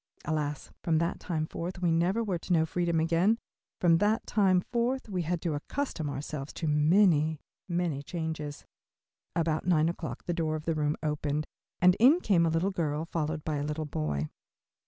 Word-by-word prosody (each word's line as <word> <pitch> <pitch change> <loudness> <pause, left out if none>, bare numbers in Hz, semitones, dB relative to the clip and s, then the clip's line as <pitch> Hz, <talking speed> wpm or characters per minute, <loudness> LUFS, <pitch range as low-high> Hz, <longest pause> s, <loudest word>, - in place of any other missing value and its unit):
Alas! 150 -1 -2
from 165 -2 +2
that 170 +1 0
time 155 -3 -2
forth 175 +3 -5
we 175 -2 +2
never 180 +7 +2
were 190 -6 -1
to 180 - -7
know 160 -1 +4
freedom 170 0 0
again; 170 +7 +3 0.4
from 165 -2 +4
that 210 +3 +2
time 190 -4 +3
forth 240 +6 -1
we 185 -4 -2
had 170 +1 -1
to 165 - 0
accustom 160 - -3
ourselves 140 0 -5
to 165 - -4
many, 155 0 +4 0.3
many 170 -5 -1
changes. 160 -2 -5 0.7
About 165 -1 0
nine 165 -2 +4
o'clock 170 - -5
the 175 - -2
door 160 -2 0
of 155 - -6
the 165 - +1
room 150 -1 0
opened 150 0 -1 0.4
and 180 0 +8
in 275 +9 +7
came 175 - +3
a - - +2
little 165 +5 +1
girl, 155 -3 -1
followed 160 -2 -2
by 155 -2 -1
a 145 - -2
little 150 +1 -2
boy. 75 - -2
165 Hz, 180 wpm, -29 LUFS, 150-180 Hz, 0.7 s, and